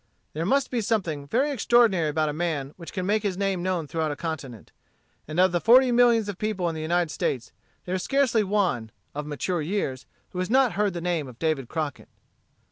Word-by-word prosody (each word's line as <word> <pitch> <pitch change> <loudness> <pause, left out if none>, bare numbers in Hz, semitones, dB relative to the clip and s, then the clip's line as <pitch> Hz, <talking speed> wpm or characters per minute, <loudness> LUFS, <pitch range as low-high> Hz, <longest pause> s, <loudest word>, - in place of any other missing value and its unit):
There 160 +3 -2
must 275 +3 +2
be 245 -2 0
something 175 -10 -1
very 270 - +1
extraordinary 230 - +3
about 155 +1 0
a 150 - -2
man 155 -4 -2
which 170 -2 -10
can 185 - -3
make 210 +2 +2
his 200 -3 -2
name 195 -2 0
known 180 -3 -1
throughout 160 +1 -2
a 145 - -3
continent. 140 -8 -6 0.6
And 155 +3 -3
of 185 0 +5
the 175 -1 0
forty 250 +3 +6
millions 235 -3 +4
of 200 -3 -5
people 210 -5 -1
in 165 - -1
the 160 - -5
United 170 0 0
States, 125 -4 -2 0.3
there 180 - -3
is 185 - -1
scarcely 265 -4 +2
one, 190 - 0 0.2
of 150 +1 -5
mature 160 +4 -2
years, 145 - -3 0.2
who 180 - -5
has 185 - -1
not 260 0 +4
heard 205 -2 0
the 170 - -3
name 170 -5 -1
of 125 -3 -12
David 155 -5 -1
Crockett. 155 -2 -4
175 Hz, 210 wpm, -26 LUFS, 155-210 Hz, 0.6 s, forty